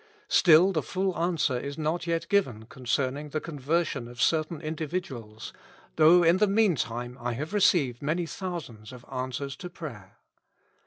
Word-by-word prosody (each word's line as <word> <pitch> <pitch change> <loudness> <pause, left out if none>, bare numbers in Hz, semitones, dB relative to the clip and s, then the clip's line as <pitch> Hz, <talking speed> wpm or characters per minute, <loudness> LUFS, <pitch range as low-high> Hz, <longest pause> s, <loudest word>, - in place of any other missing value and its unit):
Still 175 +2 +6
the 160 -5 0
full 190 +1 -2
answer 165 -7 0
is 140 +3 -6
not 160 +2 -2
yet 165 0 -1
given 130 - 0
concerning 130 +4 -2
the 155 - -2
con 155 -2 -8
i8 130 - -16
273 160 +4 +2
Notes. 170 -3 +1
version 120 - -5
of 120 0 -12
certain 155 +2 +1
individuals, 145 -9 -5 0.4
though 165 +3 +7
in 170 +2 +5
the 210 +2 +3
meantime 135 - 0
I 120 0 -2
have 150 - -5
re 205 - +2
ceived 135 -11 +3
many 160 +4 -1
thousands 160 - -7
of 125 -1 -12
answers 130 +2 -4
to 180 - -7
prayer. 125 - -10
155 Hz, 175 wpm, -27 LUFS, 125-170 Hz, 0.4 s, though